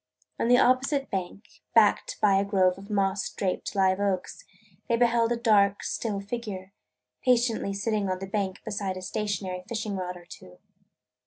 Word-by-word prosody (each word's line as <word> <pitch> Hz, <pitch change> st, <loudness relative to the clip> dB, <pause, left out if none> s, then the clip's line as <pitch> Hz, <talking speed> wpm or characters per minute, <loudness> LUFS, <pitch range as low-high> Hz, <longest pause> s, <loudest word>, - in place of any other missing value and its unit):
On -, -, +1 dB
the 245 Hz, +1 st, +6 dB
opposite 270 Hz, +3 st, +2 dB
bank, 190 Hz, +2 st, -6 dB
backed 215 Hz, -3 st, +3 dB
by 200 Hz, -2 st, +4 dB
a -, -, +1 dB
grove 190 Hz, -2 st, +2 dB
of 200 Hz, +2 st, -12 dB
moss 195 Hz, -1 st, 0 dB
draped 190 Hz, +2 st, -3 dB
live 190 Hz, -1 st, +3 dB
oaks, 195 Hz, -3 st, -2 dB, 0.5 s
they 235 Hz, -, +3 dB
beheld 235 Hz, -1 st, +3 dB
a -, -, +2 dB
dark, 205 Hz, -4 st, +3 dB
still 210 Hz, -4 st, -2 dB
figure, 200 Hz, -3 st, -6 dB, 0.5 s
patiently 235 Hz, -5 st, +2 dB
sitting 205 Hz, -1 st, -1 dB
on 185 Hz, -, -1 dB
the 190 Hz, -, -6 dB
bank 195 Hz, -1 st, -3 dB
beside 200 Hz, -3 st, -3 dB
a 185 Hz, -, -7 dB
stationary 190 Hz, -2 st, -3 dB
fishing 215 Hz, -3 st, -3 dB
rod 180 Hz, -1 st, -4 dB
or 175 Hz, -, -15 dB
two. 90 Hz, -, -13 dB
200 Hz, 165 wpm, -27 LUFS, 190-225 Hz, 0.5 s, the